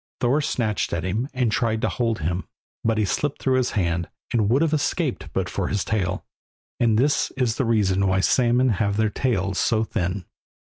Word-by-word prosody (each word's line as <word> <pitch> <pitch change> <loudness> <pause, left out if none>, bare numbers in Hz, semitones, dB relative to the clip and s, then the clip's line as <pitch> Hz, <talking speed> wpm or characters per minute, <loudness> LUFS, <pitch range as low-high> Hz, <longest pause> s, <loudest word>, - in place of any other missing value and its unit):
Thor 130 +5 +2
snatched 110 -10 -1
at 85 - -1
him, 105 +8 -1
and 125 -4 0
tried 110 -1 +1
to - - +1
hold 115 -6 -1
him, 90 +4 -2 0.4
but 110 -1 +1
he 110 - +2
slipped 145 +8 -1
through 130 -1 +2
his 125 -1 0
hand, 85 -2 0 0.2
and 110 -4 +2
would 135 +7 +3
have 160 -1 +1
escaped, 150 -1 -1
but 95 -2 -1
for 90 0 -2
his 100 -2 -1
tail, 95 -4 -1 0.5
and 115 -3 +3
this 140 +4 +2
is 125 -4 0
the 135 - +1
reason 100 -4 +2
why 95 0 +2
salmon 125 +4 +3
have 100 -1 0
their 110 -1 +2
tails 95 -6 -1
so 110 -1 +2
thin. 90 -3 -2
110 Hz, 195 wpm, -23 LUFS, 95-125 Hz, 0.5 s, would